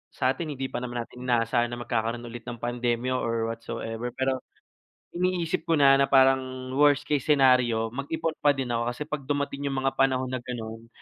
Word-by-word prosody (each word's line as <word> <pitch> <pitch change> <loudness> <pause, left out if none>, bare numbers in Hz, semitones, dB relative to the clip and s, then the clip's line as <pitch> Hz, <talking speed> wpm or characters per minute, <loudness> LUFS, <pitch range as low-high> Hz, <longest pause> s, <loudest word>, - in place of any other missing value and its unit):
sa'tin 135 +5 0
hindi 135 -1 -4
ba - - -2
naman 120 -1 -4
natin 125 +2 -10
inaasahan 120 0 +2
na 120 - -5
magkakaroon 120 0 -2
ulit 120 -1 -8
ng 120 - -4
pandemya 120 +1 -1
or 115 -1 -1
what 115 - -7
so - - -5
ever. 115 +2 -4
Pero 130 0 0 0.8
iniisip 180 -2 0
ko 165 - +3
na, 140 -1 +7
na 140 - +3
parang 130 -1 +3
worst 145 0 +4
case 145 -3 +1
scenario, 125 -5 +4
mag-ipon 160 +4 -2
pa 145 - +6
din 135 - -2
ako 115 0 0
kasi 120 +4 -5
'pag 150 -2 -4
dumating 140 0 -1
yung 135 - -2
mga 135 0 +1
panahon 130 -1 +2
na 130 - -2
gano'n, 115 -2 -7
130 Hz, 195 wpm, -27 LUFS, 120-140 Hz, 0.8 s, na